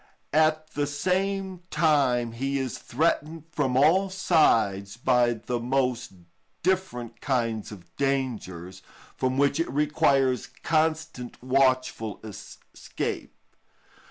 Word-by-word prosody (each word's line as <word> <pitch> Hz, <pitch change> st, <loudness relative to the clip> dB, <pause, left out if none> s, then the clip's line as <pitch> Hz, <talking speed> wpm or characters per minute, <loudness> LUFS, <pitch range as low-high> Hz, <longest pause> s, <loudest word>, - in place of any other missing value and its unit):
At 155 Hz, 0 st, +2 dB
the 145 Hz, 0 st, -1 dB
same 185 Hz, +5 st, -1 dB
time 140 Hz, -7 st, +2 dB
he 135 Hz, +4 st, -2 dB
is 130 Hz, -2 st, -3 dB
threatened 155 Hz, +2 st, -1 dB
from 130 Hz, -5 st, 0 dB
all 180 Hz, +8 st, +4 dB
sides 115 Hz, -, +2 dB
by 125 Hz, -1 st, +3 dB
the 120 Hz, +2 st, -4 dB
most 125 Hz, -2 st, -1 dB, 0.5 s
different 125 Hz, -11 st, -1 dB
kinds 115 Hz, -6 st, -1 dB
of 95 Hz, -5 st, -13 dB
dangers, 110 Hz, -10 st, -2 dB, 0.3 s
from 130 Hz, 0 st, -1 dB
which 140 Hz, +2 st, +2 dB
it 165 Hz, -, 0 dB
requires 140 Hz, -4 st, +2 dB, 0.2 s
constant 155 Hz, -5 st, -1 dB
watchfulness 130 Hz, -6 st, 0 dB
to -, -, -33 dB
escape. -, -, -5 dB
135 Hz, 105 wpm, -26 LUFS, 120-155 Hz, 0.5 s, all